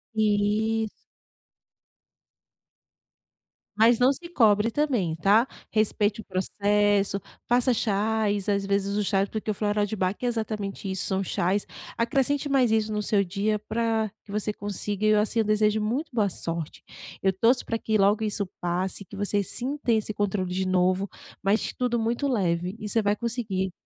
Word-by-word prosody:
Isso. 215 Hz, +1 st, +1 dB, 2.9 s
Mas 225 Hz, +2 st, +5 dB
não 255 Hz, +2 st, +5 dB
se 340 Hz, +5 st, -7 dB
cobre 220 Hz, -8 st, +4 dB
também 240 Hz, -, 0 dB
tá? 205 Hz, +9 st, +4 dB, 0.2 s
Respeite 215 Hz, 0 st, +1 dB
o -, -, -17 dB
processo, 205 Hz, +1 st, +1 dB, 0.3 s
faça 245 Hz, +1 st, +3 dB
chás, 210 Hz, -1 st, 0 dB
às 200 Hz, -1 st, +1 dB
vezes 200 Hz, 0 st, 0 dB
os 210 Hz, -, 0 dB
chás, 195 Hz, 0 st, +1 dB
porque 220 Hz, 0 st, -4 dB
o -, -, +2 dB
floral 205 Hz, 0 st, 0 dB
de 205 Hz, -, -4 dB
Bach 185 Hz, -1 st, 0 dB
é -, -, -2 dB
exatamente 215 Hz, -4 st, -3 dB
isso. 190 Hz, 0 st, -2 dB
São 190 Hz, 0 st, 0 dB
chás, 190 Hz, +2 st, 0 dB, 0.3 s
acrescente 275 Hz, +4 st, +1 dB
mais 260 Hz, -4 st, +3 dB
isso 220 Hz, -1 st, +1 dB
no 210 Hz, 0 st, -1 dB
seu 205 Hz, -1 st, +2 dB
dia 200 Hz, +3 st, -1 dB
pra 220 Hz, 0 st, -1 dB
que 200 Hz, -, -13 dB
você 210 Hz, +1 st, -1 dB
consiga 205 Hz, 0 st, -3 dB
E -, -, +5 dB
eu 215 Hz, -1 st, +5 dB
assim, 220 Hz, +2 st, 0 dB
eu 220 Hz, -, +2 dB
desejo 215 Hz, 0 st, +2 dB
muito 245 Hz, +9 st, -1 dB
boa 210 Hz, -4 st, +2 dB
sorte. 165 Hz, -3 st, -5 dB, 0.4 s
Eu 190 Hz, -, +4 dB
torço 230 Hz, +7 st, +2 dB
para 230 Hz, -, -1 dB
que 220 Hz, -1 st, 0 dB
logo 205 Hz, +2 st, +3 dB
isso 210 Hz, -1 st, -1 dB
passe, 185 Hz, +3 st, -2 dB
que 200 Hz, -, -12 dB
você 205 Hz, 0 st, 0 dB
sinta 255 Hz, +6 st, -1 dB
esse 215 Hz, -1 st, +1 dB
controle 190 Hz, -3 st, -1 dB
de 190 Hz, 0 st, -1 dB
novo, 185 Hz, +1 st, +1 dB, 0.3 s
mas 200 Hz, +3 st, +1 dB
tudo 245 Hz, -1 st, 0 dB
muito 235 Hz, +5 st, 0 dB
leve 180 Hz, -6 st, 0 dB
e 210 Hz, -, -5 dB
você 225 Hz, -, +2 dB
vai 205 Hz, 0 st, +1 dB
conseguir. 210 Hz, -5 st, -2 dB
210 Hz, 165 wpm, -26 LUFS, 200-225 Hz, 2.9 s, Mas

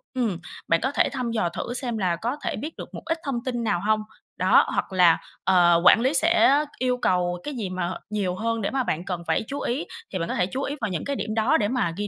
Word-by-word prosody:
ừm, 225 Hz, -9 st, 0 dB, 0.3 s
bạn 165 Hz, -, +3 dB
có 265 Hz, -, +1 dB
thể -, -, +2 dB
thăm 250 Hz, -3 st, -3 dB
dò 215 Hz, -7 st, 0 dB
thử 235 Hz, -, -5 dB
xem 245 Hz, -3 st, -2 dB
là 180 Hz, -4 st, +1 dB
có 235 Hz, +10 st, -2 dB
thể -, -, -2 dB
biết 310 Hz, +2 st, -6 dB
được -, -, -9 dB
một -, -, -7 dB
ít 325 Hz, 0 st, 0 dB
thông 250 Hz, -4 st, -2 dB
tin 240 Hz, -2 st, -2 dB
nào 175 Hz, -6 st, 0 dB
hông, 215 Hz, 0 st, +2 dB, 0.4 s
đó. -, -, +5 dB
Hoặc -, -, -2 dB
là, 175 Hz, -3 st, +5 dB, 0.3 s
ờ, 175 Hz, -2 st, +5 dB
quản -, -, +8 dB
lý 260 Hz, +4 st, +2 dB
sẽ 305 Hz, -1 st, +4 dB, 0.2 s
yêu 250 Hz, -1 st, +1 dB
cầu 180 Hz, -6 st, 0 dB
cái 295 Hz, -, -4 dB
gì 215 Hz, -6 st, -3 dB
mà, 185 Hz, -1 st, -2 dB, 0.2 s
nhiều 200 Hz, -4 st, -1 dB
hơn 230 Hz, +2 st, -1 dB
để 200 Hz, -, -1 dB
mà 265 Hz, -1 st, 0 dB
bạn 175 Hz, -6 st, -2 dB
cần 180 Hz, -3 st, -4 dB
phải -, -, +1 dB
chú 280 Hz, +1 st, -4 dB
ý, 255 Hz, +6 st, -2 dB, 0.3 s
thì -, -, -1 dB
bạn 170 Hz, -, -3 dB
có -, -, -2 dB
thể 180 Hz, -, +2 dB
chú 260 Hz, +7 st, -4 dB
ý 285 Hz, -, -3 dB
vào 220 Hz, -, -1 dB
những 180 Hz, -, -3 dB
cái 280 Hz, -, -2 dB
điểm 215 Hz, -4 st, -3 dB
đó 225 Hz, +3 st, +3 dB
để 205 Hz, -, +1 dB
mà 220 Hz, -8 st, 0 dB
ghi 205 Hz, 0 st, -2 dB
220 Hz, 270 wpm, -25 LUFS, 180-255 Hz, 0.4 s, quản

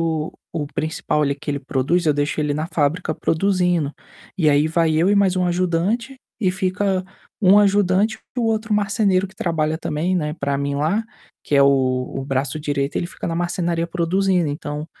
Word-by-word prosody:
o 160 Hz, -2 st, -1 dB, 0.2 s
o 150 Hz, -3 st, -2 dB
principal 150 Hz, 0 st, -1 dB
ali, 140 Hz, -1 st, +1 dB
que 145 Hz, -, -6 dB
ele 140 Hz, -, -1 dB
produz, 140 Hz, +6 st, 0 dB
eu 150 Hz, -, +4 dB
deixo 145 Hz, +2 st, -1 dB
ele 150 Hz, -1 st, +1 dB
na 155 Hz, +2 st, -2 dB
fábrica 155 Hz, +1 st, 0 dB
produzindo, 180 Hz, -4 st, +1 dB, 0.5 s
e 155 Hz, -5 st, +3 dB
aí 145 Hz, +2 st, +3 dB
vai 165 Hz, -1 st, +2 dB
eu 170 Hz, +4 st, +3 dB
e 205 Hz, -, +4 dB
mais 195 Hz, -2 st, +3 dB
1 180 Hz, -1 st, +1 dB
ajudante 185 Hz, +9 st, 0 dB, 0.2 s
e 190 Hz, -5 st, +2 dB
fica 190 Hz, 0 st, 0 dB, 0.4 s
1 195 Hz, +1 st, +6 dB
ajudante 205 Hz, +1 st, +3 dB, 0.2 s
para 245 Hz, -, -1 dB
o -, -, +1 dB
outro 220 Hz, -1 st, 0 dB
marceneiro 200 Hz, -2 st, +2 dB
que 190 Hz, -, -18 dB
trabalha 160 Hz, -3 st, -1 dB
também, 165 Hz, +4 st, -1 dB
né, 150 Hz, -4 st, -1 dB
para 140 Hz, 0 st, -1 dB
mim 140 Hz, 0 st, -2 dB
lá, 160 Hz, +10 st, +1 dB, 0.4 s
que -, -, -2 dB
é 140 Hz, -, +6 dB
o 130 Hz, -2 st, +2 dB
o 135 Hz, -, -3 dB
braço 135 Hz, +2 st, -2 dB
direito 145 Hz, -1 st, -2 dB
ele 170 Hz, -, -1 dB
fica -, -, -7 dB
na 165 Hz, -, -2 dB
marcenaria 170 Hz, -1 st, -1 dB
produzindo 180 Hz, +1 st, +1 dB
então, 150 Hz, 0 st, -5 dB
165 Hz, 190 wpm, -21 LUFS, 150-185 Hz, 0.5 s, 1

